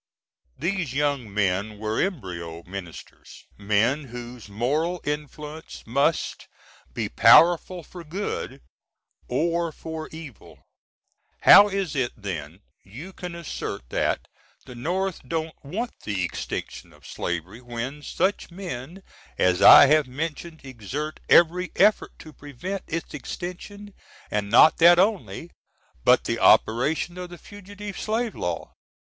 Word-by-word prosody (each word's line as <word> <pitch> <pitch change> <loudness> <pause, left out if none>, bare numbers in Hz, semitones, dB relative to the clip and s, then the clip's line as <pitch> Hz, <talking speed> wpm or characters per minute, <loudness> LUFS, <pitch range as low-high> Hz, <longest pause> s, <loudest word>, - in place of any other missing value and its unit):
These 175 -5 -2
young 140 -6 -1
men 100 +1 -1
were 110 +1 -2
embryo 85 - -4
Ministers 90 -3 -10
men 110 +8 +1
whose 120 -3 -9
moral 150 - -1
influence 150 +1 -6
must 140 +7 0 0.4
be - - -3
powerful 175 +1 +5
for 175 +2 -11
good 180 +6 -5 0.7
or 170 +5 0
for 160 0 -7
evil. 155 -8 -12 0.8
How 205 - +9
is 195 -6 -2
it 130 -3 -1
then 90 -4 -6 0.2
you 145 - -10
can 180 -2 -7
assert 145 - -6
that - - -1 0.4
the 125 - -10
North 180 +9 -2
don't 160 -1 -2
want 215 - -4
the 100 -4 -2
extinction 85 - -5
of - - -20
slavery 90 +6 -5
when 125 +4 -6
such 190 +6 -1
men 175 -1 -8 0.3
as 90 -1 +2
I - - +10
have 150 0 +3
mentioned 160 +4 -5
exert 135 +5 -6
every 175 +2 +4
effort 210 +2 +2
to 155 - -13
prevent 145 +8 -6
its 165 0 -5
extension 185 +7 -7 0.3
& - - -27
not 105 +9 +5
that 170 +1 +8
only, 190 -3 0 0.5
but - - +5
the - - -2
operation 155 +10 +3
of 180 -1 -6
the 175 - -10
_fugitive 205 +1 -10 0.3
S. - - -18
law? - - -4
150 Hz, 125 wpm, -24 LUFS, 115-175 Hz, 0.8 s, I